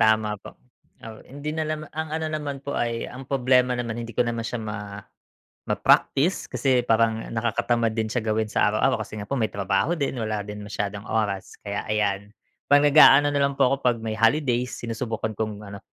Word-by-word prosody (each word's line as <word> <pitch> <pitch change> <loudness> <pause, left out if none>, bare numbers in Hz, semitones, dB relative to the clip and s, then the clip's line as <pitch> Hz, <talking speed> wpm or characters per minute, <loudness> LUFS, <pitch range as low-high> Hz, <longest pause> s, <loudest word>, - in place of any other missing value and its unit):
Tama 110 -1 +3
po. - - -12 0.4
Taw 110 -1 -11
hindi 145 +3 -5
na 160 0 -2
lam 155 0 -3
ang 160 0 -4
ano 160 -1 -2
naman 145 -3 -4
po 140 - -3
ay 115 -3 -1
ang 130 +1 -9
problema 125 -2 +3
naman, 120 -1 -3
hindi 115 0 -7
ko - - +3
naman 120 0 -2
siya 120 - -3
ma 105 -1 -6 0.7
ma-practice 170 +7 +2
kasi 130 -3 +2
parang 115 -1 +1
nakakatamad 115 0 0
din 110 -1 -1
siya 120 0 -2
gawin 110 0 0
sa 105 - +2
araw-araw 110 0 +1
kasi 105 0 -8
nga 100 - -8
po 140 - -1
may 110 -5 -1
trabaho 100 - 0
din, 140 -5 -2
wala 110 -2 -2
din 105 0 -7
masyadong 100 0 -4
oras, 105 -4 -2
kaya, 100 0 -4
ayan. 105 -1 -1 0.3
'Pag 145 0 +5
naga-ano 145 -1 +7
nalang 140 -1 0
po 130 - +6
ako 135 - +1
'pag 120 -1 +3
may 110 -1 -4
holidays, 125 +1 +1
sinusubukan 115 -2 -4
kong 105 -1 -3
ano, 100 0 -8
115 Hz, 190 wpm, -24 LUFS, 110-135 Hz, 0.7 s, naga-ano